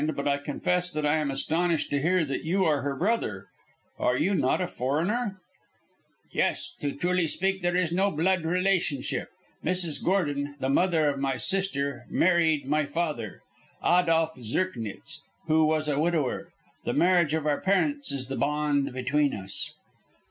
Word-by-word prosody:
But 140 +1 -2
I 140 0 +2
confess 180 +5 -1
that 155 -1 -1
I 150 +2 +3
am 150 -2 -1
astonished 160 +4 0
to 140 -1 +1
hear 175 +2 +2
that 135 -2 -3
you 185 +4 +1
are 150 -3 +2
her 140 +1 -2
brother. 135 - -1 0.5
Are 125 - +2
you 185 +8 +1
not - - +2
a 180 - 0
foreigner?" 175 - -1 1.0
"Yes, - - 0
to 145 - 0
speak 140 - -9
truly 180 +2 +1
there 175 0 0
is 180 -3 +1
no 190 +3 +2
blood 185 +2 +1
relationship. 180 -5 0 0.3
Mrs. 175 -3 0
Gordon, 145 -6 0
the 130 - -1
mother 160 +1 +3
of 140 -1 0
my 135 -1 0
sister, 140 -8 -1
married 165 -5 +3
my 150 +3 +1
father, 145 - -3 0.4
Adolph 165 -2 +3
Zirknitz, 115 - -3 0.2
who 160 -1 +4
was 155 0 +1
a 145 -1 0
widower. 155 -5 0 0.3
The - - -1
marriage 175 -4 +3
of 160 -2 -2
our 150 -1 +1
parents 280 +10 +1
is 135 -2 -2
the 135 - -4
bond 145 -1 +1
between 135 +3 +1
us." 95 -1 -3
155 Hz, 160 wpm, -27 LUFS, 140-180 Hz, 1.0 s, who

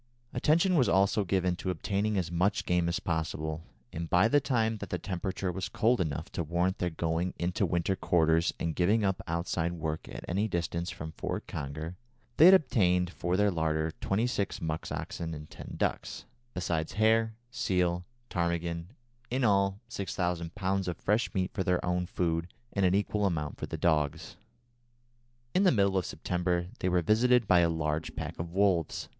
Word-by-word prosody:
Attention 170 +5 +3
was 130 -7 +4
also 100 +2 +3
given 90 -1 +1
to 95 - -4
obtaining 100 +4 -1
as 85 -3 -1
much 90 +4 +1
game 90 -1 +2
as 85 - -1
possible, 80 -1 -2 0.3
and 85 0 -4
by 90 +5 +5
the 145 +5 +4
time 115 -4 +1
that - - -7
the - - -1
temperature 95 0 -3
was 95 +1 -4
cold 115 +1 +2
enough 75 -5 -3
to - - -2
warrant 85 +4 0
their 90 - 0
going 85 +2 -1
into 90 +1 0
winter 90 +2 0
quarters 80 -1 +2
and 85 - -1
giving 100 +6 +2
up 95 +1 0
outside 85 0 -1
work 80 -2 -4
at - - -8
any 100 +5 0
distance 85 -2 -2
from 80 -4 -6
Fort - - -4
Conger, 80 +5 -5 0.4
they 155 - +8
had 190 +2 +10
obtained 90 - +2
for 90 0 -1
their 105 0 +3
larder 80 -2 0
twenty 105 +5 +1
six 100 -5 -1
musk 80 -1 -3
oxen 80 -1 -4
and 75 0 -10
ten - - -9
ducks, - - -2 0.3
besides 85 -3 -1
hare, 110 +1 +3 0.2
seal, 90 -5 +1
and 90 - -10 0.3
ptarmigan, 85 -1 -1 0.4
in 130 +2 0
all 100 -2 +2
6000 90 -5 -3
lbs. 95 -1 -1
of 90 - -2
fresh 105 +4 +1
meat 95 -1 0
for 95 - -1
their 90 -1 +1
own 90 0 0
food, 85 -1 -1 0.3
and 100 -2 +3
an 90 - +2
equal 105 0 +1
amount 75 -5 -3
for - - -4
the - - -5
dogs. 80 -1 0 1.2
In 185 - +3
the 190 - +5
middle 100 -4 +2
of 95 - +1
September 90 0 -1
they 90 - 0
were 90 -1 +2
visited 120 +4 +4
by 90 -1 +6
a 85 -1 +4
large 80 -1 -2
pack - - -5
of 85 0 -4
wolves. 95 -4 +1
90 Hz, 185 wpm, -30 LUFS, 85-100 Hz, 1.2 s, had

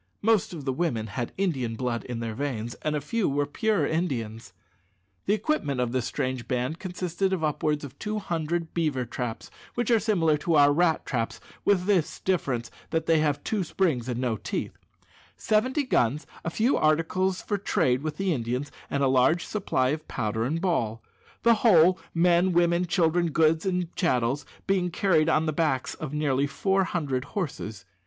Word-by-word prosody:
Most 220 -2 +3
of 155 -6 -7
the 135 - 0
women 130 -8 -1
had 115 +3 -4
Indian 135 -12 -1
blood 120 -1 -2
in 120 -2 -4
their 115 -1 -3
veins, 120 -3 -3
and 155 0 -1
a 150 - -1
few 210 - 0
were 145 +1 +1
pure 210 +9 0
Indians. 115 - -2 0.8
The 205 - +4
equipment 160 - -1
of 125 -1 0
this 125 -1 -1
strange 130 -2 -3
band 125 +5 -1
consisted 180 +1 -2
of 185 -4 -1
upwards 150 0 0
of 140 0 -12
two 215 0 -2
hundred 170 -3 -2
beaver 150 -7 0
traps 115 -1 -5 0.2
which 240 -1 0
are 230 - +5
similar 175 -8 +2
to 165 +2 0
our 145 -1 +6
rat 165 0 +2
traps, 115 -3 -2 0.2
with 185 -3 +2
this 180 -6 +1
difference, 135 -11 -1 0.2
that 160 -1 -1
they 165 -1 +4
have 145 -2 0
two 210 -4 -1
springs 155 -8 0
and 120 -1 -2
no 120 -4 0
teeth 105 - -4 0.6
seventy 255 +7 +1
guns, 145 - +1 0.2
a - - -1
few 225 +10 +2
articles 170 +5 +1
for 205 -2 -1
trade 130 -9 +1
with 155 0 -4
the 195 -2 +1
Indians, 125 +2 -3 0.2
and 140 0 0
a - - +4
large 130 +6 +3
supply 130 -11 0
of 155 +2 -3
powder 110 -1 -2
and 160 +6 -1
ball; 115 - -1 0.4
the 235 - +6
whole 180 -5 +6 0.2
men, 175 +2 +4
women, 170 +1 +3
children, 170 -1 +2
goods, 160 +3 +2
and 180 -2 -1
chattels 130 -5 0 0.2
being 190 -2 +1
carried 170 -3 +2
on 155 0 +3
the 155 - 0
backs 145 -5 0
of 155 -3 -6
nearly 145 -2 +1
four 195 +5 +1
hundred 140 -8 -2
horses. 130 - -5
155 Hz, 180 wpm, -27 LUFS, 130-180 Hz, 0.8 s, our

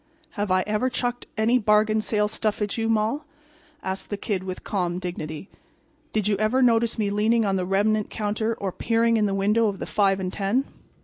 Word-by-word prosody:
"Have 205 -1 -3
I 185 0 +3
ever 215 +5 0
chucked 245 -1 -2
any 230 +3 +3
bargain 215 0 +3
sale 210 -1 +1
stuff 215 0 -1
at 210 -1 -2
you, 225 -1 -1
Moll?" 225 +6 +1 0.6
asked 190 0 -4
the 205 - -3
Kid, 200 -2 -2
with 185 -1 -6
calm 180 -3 -1
dignity. 175 -2 -5 0.6
"Did 215 -2 0
you 210 - +2
ever 215 +6 +2
notice 235 -1 +3
me 205 -2 0
leaning 220 +2 +2
on 195 -1 +1
the 180 -1 -1
remnant 210 +2 +1
counter 220 +2 -1
or 195 -3 -3
peering 230 +3 +1
in 215 -2 +2
the 195 - -1
window 210 +3 +2
of 200 -2 -2
the - - -5
five 195 -1 +2
and 185 -1 -3
ten? 215 +7 0
210 Hz, 200 wpm, -25 LUFS, 195-225 Hz, 0.6 s, I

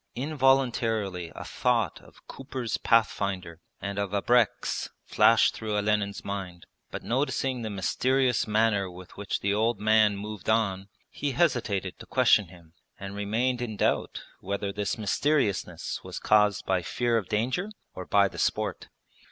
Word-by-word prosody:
Involuntarily 120 - +1
a - - -6
thought 115 -8 0
of - - -20
Cooper's 130 -3 -4
Pathfinder 95 -6 0 0.2
and 100 0 -4
of 100 -1 -2
abreks 120 +3 +1 0.2
flashed - - +4
through 105 -1 -3
Olenin's 105 -1 0
mind, 95 -3 -5 0.2
but - - -6
noticing 130 0 -1
the 110 - -3
mysterious 125 +6 +1
manner 105 -3 +2
with 90 0 -12
which 100 0 -3
the 100 0 +1
old 110 +3 +1
man 110 -1 +4
moved 105 -1 -6
on, 100 -3 +1 0.2
he 145 -2 -3
hesitated 110 - 0
to - - -11
question 120 -6 +4
him 85 -2 -17 0.3
and 100 0 -6
remained 115 +5 0
in 110 -4 -4
doubt - - 0 0.2
whether 100 +1 -3
this 100 -1 -2
mysteriousness 100 - -1
was - - -7
caused 105 -1 +3
by 95 -1 +1
fear 120 +8 0
of 110 -5 -1
danger 125 - -1 0.2
or 95 - -8
by 100 -1 +4
the - - -9
sport. - - -1
105 Hz, 145 wpm, -27 LUFS, 100-120 Hz, 0.3 s, flashed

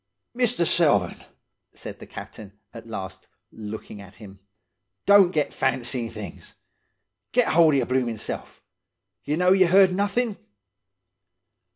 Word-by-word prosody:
"'Mister 245 -6 +1
Selvern,' 145 - +2 0.5
said - - -9
the - - -11
captain, 100 -2 -10 0.2
at 115 -1 -11
last, 95 -3 -7 0.2
looking 105 -1 -8
at 100 0 -14
him, 100 -1 -13 0.7
'don't 200 -2 +6
get 155 -5 -1
fancying, 125 -2 -2
things. 110 -3 -10 0.8
Get 245 -2 +3
hold 160 -2 +5
of - - +3
your 130 - +1
bloomin' 125 -3 -1
self. - - -7 0.6
Ye 150 - -1
know 180 +2 +3
ye 190 -1 +5
heard 190 +1 +5
nothin'? 205 +3 -1
135 Hz, 130 wpm, -24 LUFS, -, 0.8 s, don't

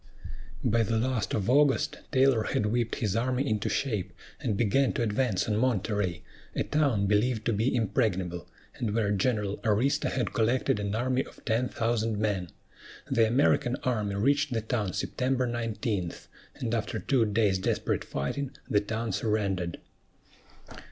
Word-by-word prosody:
By 115 +2 +3
the 115 +1 +1
last 120 -1 0
of 100 -2 -1
August, 140 +2 +3
Taylor 130 -3 +4
had 105 - 0
whipped 115 +2 0
his 105 -3 -1
army 130 +4 0
into 110 -4 0
shape, 105 -9 -1 0.3
and 105 - -1
began 125 +5 +2
to 120 - 0
advance 105 -3 0
on 105 -1 +1
Monterey, 105 -6 0 0.3
a - - +1
town 140 -10 +1
believed 110 +3 +1
to 115 - +2
be 115 +5 +1
impregnable, 95 -7 -1 0.3
and 110 -3 -2
where 105 -3 +1
General 105 -1 0
Arista 125 +8 +1
had 125 -5 -1
collected 115 -1 +1
an 100 0 -2
army 130 +3 +1
of - - -16
ten 120 +2 +1
thousand 115 -1 0
men. 100 -5 -1 0.6
The 115 -1 +4
American 125 0 +2
army 105 -5 0
reached 140 +7 +2
the 115 - 0
town 110 -4 -2
September 130 0 0
19; 110 -6 -2 0.4
and 115 -2 -3
after 115 -2 -1
two 130 -4 +2
days' 105 -3 +2
desperate - - -1
fighting 130 - -3
the 105 - +2
town 110 +2 -3
surrendered. 95 -5 -1
110 Hz, 150 wpm, -28 LUFS, 105-125 Hz, 0.6 s, Taylor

